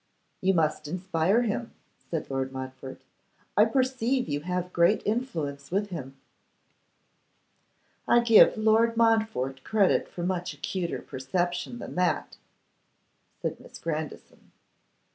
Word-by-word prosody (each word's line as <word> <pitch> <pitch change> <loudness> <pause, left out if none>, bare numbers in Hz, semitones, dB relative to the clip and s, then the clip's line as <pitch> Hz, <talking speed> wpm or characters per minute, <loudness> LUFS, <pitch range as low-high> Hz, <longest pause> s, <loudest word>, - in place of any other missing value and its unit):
'You 190 0 +3
must 155 -2 +1
inspire 185 +5 +1
him,' 230 +1 -3 0.4
said 160 -4 -3
Lord 135 0 -2
Montfort. 130 0 -8 0.5
'I 210 - +6
perceive 255 +1 0
you 145 -1 -1
have 180 +3 -3
great 175 +5 +3
influence 160 - -2
with 205 +3 -1
him.' 135 -5 -7 1.9
'I 240 - +5
give 230 -2 +7
Lord 220 +1 +3
Montfort 220 - +1
credit 205 -4 +2
for 175 - -6
much 175 -3 -2
acuter 170 +4 -3
perception 175 - -2
than - - -7
that,' 180 -2 0 1.1
said - - -2
Miss - - -12
Grandison. 155 -2 -6
180 Hz, 115 wpm, -27 LUFS, 150-220 Hz, 1.9 s, give